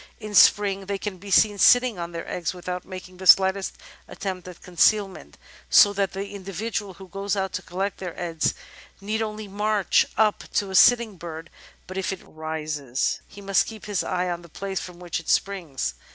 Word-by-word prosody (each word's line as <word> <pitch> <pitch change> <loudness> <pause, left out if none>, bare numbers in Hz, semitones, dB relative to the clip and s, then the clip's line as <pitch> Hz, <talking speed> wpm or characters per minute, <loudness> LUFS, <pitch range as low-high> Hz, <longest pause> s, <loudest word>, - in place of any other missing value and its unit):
In 215 -2 -7
Spring 195 -1 +5
they 200 0 -2
can 195 -2 -5
be 200 +2 -10
seen 205 +1 +4
sitting 245 -2 +5
on 170 0 -5
their 170 -1 -6
eggs 180 +1 -3
without 180 0 -5
making 185 -1 -10
the 190 0 -5
slightest 190 +1 +5 0.3
attempt 185 -2 -6
at 180 -1 -11
concealment, 195 +3 +1 0.3
so 205 -1 +7
that 195 -2 -1
the 195 +1 -4
indi 200 -1 -8
vidual 205 0 -4
who 190 +1 -12
goes 195 +3 -3
out 195 -1 -2
to - - -3
collect 195 +3 -4
their 180 -3 -6
eggs 165 -2 -1 0.4
need 215 +3 -2
only 215 -1 -4
march 205 0 +1
up 215 -1 +2
to 200 -2 0
a - - -3
sitting 235 -2 +5
bird, 165 -1 -8 0.3
but 185 +1 -5
if 190 - -2
it 190 - -6
rises 155 -4 -3
he 200 - -13
must 195 -1 +2
keep 220 -2 -9
his 205 -3 -1
eye 180 0 -1
on 175 -1 -3
the 170 - -15
place 195 +3 -4
from 180 -1 -9
which 175 -2 -4
it 165 - -9
springs. 160 - -1
190 Hz, 195 wpm, -24 LUFS, 175-205 Hz, 0.4 s, so